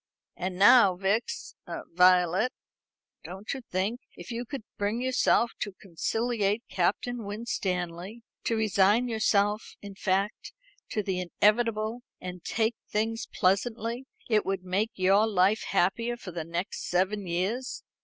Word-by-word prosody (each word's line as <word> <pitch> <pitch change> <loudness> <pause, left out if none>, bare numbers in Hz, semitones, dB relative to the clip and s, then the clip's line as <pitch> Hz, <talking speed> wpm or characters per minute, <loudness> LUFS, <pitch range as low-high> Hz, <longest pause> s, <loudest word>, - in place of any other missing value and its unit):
And 180 0 -4
now, 200 -1 +7
Vix 195 +5 -1 0.4
Violet, 180 +5 +5 0.7
don't 190 +4 -6
you 270 - -6
think 205 +2 -2 0.2
if - - -9
you 240 +1 -3
could 270 -1 -6
bring 205 +3 -1
yourself 250 -2 +2
to 205 - -3
conciliate 215 +4 -1
Captain 225 +6 -1
Winstanley 195 -1 -3 0.2
to 230 - +1
resign 215 +2 +3
yourself, 215 -2 +1
in 200 -1 -9
fact, 195 +2 -1 0.4
to 210 - -1
the 190 -2 -1
inevitable, 215 +5 +1 0.2
and 180 -1 -7
take 225 0 0 0.2
things 225 +2 -1
pleasantly, 230 +6 0 0.2
it 215 -3 +3
would 195 -1 -2
make 190 +4 0
your 195 +4 +4
life 200 +1 +2
happier 230 +7 +1
for 190 - -8
the 165 -2 -5
next 170 +3 -4
seven 190 +2 0
years? 195 +9 -2
205 Hz, 130 wpm, -28 LUFS, 185-230 Hz, 0.7 s, now